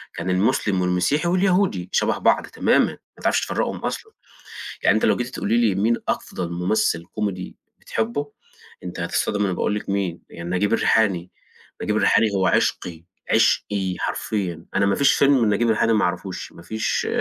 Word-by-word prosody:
كان 85 +2 -4
المسلم 95 0 +1
والمسيحي 90 - +1
واليهودي 185 - +1
شبه - - +1
بعض - - +2
تمامًا، - - +2
ما - - -12 0.3
تعرفش - - +2
تفرقهم - - -2
أصلًا، - - -5 0.7
يعني 100 - +4
أنتِ 110 - 0
لو - - +3
جيتِ 120 - -2
تقولي 115 -3 -1
لي 115 -5 +3
مين 110 +5 +2
أفضل 85 -2 -3
ممثل 90 -1 0
كوميدي 95 0 -4 0.2
بتحبه؟ 140 +6 -3 0.5
أنتِ 90 -1 -6
هتتصدمي 100 +4 -1
لمّا 95 - 0
أقول 105 - 0
لكِ 105 - -5
مين 95 -4 -2
يعني، 85 +1 -7
نجيب 95 +3 0
الريحاني، 95 -6 +2 0.5
نجيب 105 - 0
الريحاني 110 - +4
هو 95 -1 +2
عشقي، 85 -2 0 0.3
عشقي 95 -3 +2
حرفيًا، 90 -6 -3
أنا 100 - +2
ما 100 - +2
فيش 140 0 +4
فيلم 140 -3 +4
لنجيب 105 +3 +2
الريحاني 115 +1 +2
ما 110 - +2
اعرفوش، 90 +1 -4
ما 85 - -14
فيش 110 +3 -2
100 Hz, 165 wpm, -22 LUFS, 90-115 Hz, 0.7 s, يعني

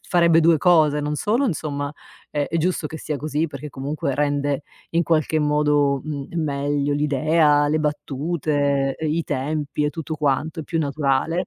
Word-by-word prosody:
farebbe 170 -2 +4
2 165 0 +4
cose: 155 -3 +4
non 150 +1 -2
solo, 230 - +1
insomma, 145 - -3 0.4
è 145 -1 -1
è 165 - 0
giusto 175 0 0
che 160 - -7
sia 150 0 -3
così 150 +3 -1
perché 145 -1 -8
comunque 140 0 -3
rende 145 -1 0 0.3
in 170 +1 +2
qualche 155 0 +1
modo, 150 -2 +2
mhmm, 145 -3 -5
meglio 145 0 -1
l'idea, 150 +1 +3
le 155 +1 +1
battute, 145 -2 -1
ehm, 160 - -2
i 165 +1 0
tempi 145 +1 -2
e 150 - +1
tutto 160 0 -5
quanto, 150 +3 0
è - - -5
più 165 +2 -2
naturale. 150 +4 0
150 Hz, 170 wpm, -22 LUFS, 145-160 Hz, 0.4 s, farebbe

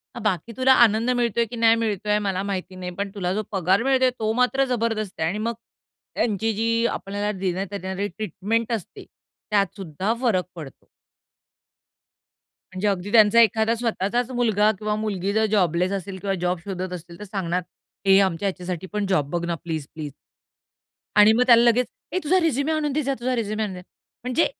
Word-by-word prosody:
अ - - -5
बाकी 205 0 -1
तुला 260 0 +5
आनंद 225 +3 0
मिळतोय 235 -2 +1
की - - -5
नाही 225 -1 +5
मिळतोय 210 -1 0
मला 195 -2 -1
माहिती 185 -1 -4
नाही, 180 -1 -6
पण 200 +1 -3
तुला 180 -2 -1
जो 215 +2 -1
पगार 190 +2 +2
मिळतोय 260 -1 +3
तो 220 0 0
मात्र 265 +2 +3
जबरदस्त 225 -4 -2
आहे 160 - +1
आणि 205 - -3
मग 235 - -2 0.6
त्यांची 220 0 0
जी 230 +2 +1
आपल्याला 205 0 -3
देण्यात 190 +1 -2
येणारी 190 +2 -2
ट्रीटमेंट 215 +4 -2
असते, 215 -6 -6 0.5
त्यात 200 -3 +1
सुद्धा 190 +3 -2
फरक 200 -8 +1
पडतो. 150 -6 -10 1.9
म्हणजे 185 +3 -1
अगदी 195 0 -2
त्यांचा 220 0 +6
एखादा 220 +1 +3
स्वतःचाच 235 +1 -1
मुलगा 220 -4 +2
किंवा 210 +1 -1
मुलगी 200 -3 -2
जर 220 +1 +2
जॉबलेस 180 -2 +2
असेल 195 0 -4
किंवा 195 -1 -1
जॉब 180 0 0
शोधत 185 -2 -4
असतील 170 -1 -9
तर 210 - -7
सांगणार, 185 -3 -2 0.4
"ए 195 0 +6
आमच्या 190 0 0
ह्याच्यासाठी 180 -1 -5
पण 210 -1 -1
जॉब 150 -7 +1
बघ 170 +1 -2
ना, 170 0 -1
प्लीज-प्लीज." 155 -2 -5 1.0
आणि 210 +1 +8
मग 240 - +3
त्याला 235 -1 +7
लगेच, 240 +1 +4 0.3
"ए - - +1
तुझा 360 +5 +3
रिझ्युमे 310 -1 +1
आणून 305 -2 0
दे 305 +2 0
जा 275 0 -1
तुझा 255 +1 0
रिझ्युम 215 -1 -2
आणून 210 -3 -2
दे." 180 - -9 0.4
म्हणजे 255 +6 +2
205 Hz, 180 wpm, -23 LUFS, 185-230 Hz, 1.9 s, आणि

